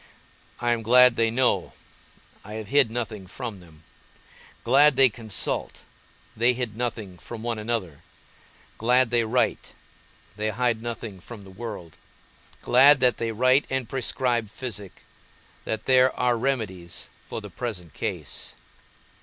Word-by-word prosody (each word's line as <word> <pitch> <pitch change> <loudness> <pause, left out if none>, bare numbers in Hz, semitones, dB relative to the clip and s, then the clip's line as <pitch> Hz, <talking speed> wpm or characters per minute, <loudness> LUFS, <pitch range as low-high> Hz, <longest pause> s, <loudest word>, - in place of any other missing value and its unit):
I 120 0 0
am 115 - -3
glad 125 +2 +6
they 115 -1 +2
know 125 +2 +1 0.7
(I 105 - -10
have 110 -2 -7
hid 140 -3 +4
nothing 110 -4 -5
from 115 0 -7
them), 80 -3 -17 0.8
glad 135 +4 +5
they 135 0 +6
consult 110 -5 -1 0.5
(they 120 +3 +3
hid 120 -4 -4
nothing 110 -6 -4
from 115 -2 -9
one 115 -2 -2
another), 105 -9 -3 0.8
glad 125 +1 +3
they 120 -1 +3
write 120 +3 -1 0.6
(they 105 +1 -1
hide 115 0 0
nothing 115 -4 -6
from 105 +3 -11
the 95 - -13
world), 100 -6 -8 0.7
glad 135 +3 +6
that 125 -2 +4
they 115 -1 -2
write 130 +5 +3
and 130 -3 -2
prescribe 125 -3 -1
physic, 105 -5 -7 0.6
that 110 -1 -3
there 130 0 +5
are 125 -1 +2
remedies 105 -9 -3
for - - -6
the 105 -2 -10
present 90 - -5
case. - - -5
115 Hz, 135 wpm, -25 LUFS, 105-125 Hz, 0.8 s, glad